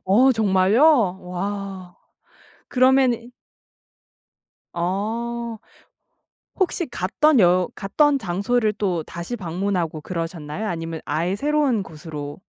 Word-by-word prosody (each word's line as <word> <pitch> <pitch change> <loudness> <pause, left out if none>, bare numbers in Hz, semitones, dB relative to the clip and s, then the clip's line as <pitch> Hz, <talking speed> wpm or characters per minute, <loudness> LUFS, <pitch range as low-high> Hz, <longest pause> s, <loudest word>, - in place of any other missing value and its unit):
어 240 +8 +5
정말요? 210 - +3
와. 190 0 -5 0.7
그러면은 255 -2 +3 1.4
어. 225 +6 -3 1.0
혹시 365 -2 0
갔던 255 +6 +2
여 180 -1 +4
갔던 280 +9 +2
장소를 215 +3 0
또 185 -5 -1
다시 170 +9 -6
방문하고 180 -3 -2
그러셨나요? 165 +2 -4
아니면 165 -2 -4
아예 170 +6 -1
새로운 285 -4 +1
곳으로 150 -4 -8
195 Hz, 205 characters per minute, -22 LUFS, 175-235 Hz, 1.4 s, 어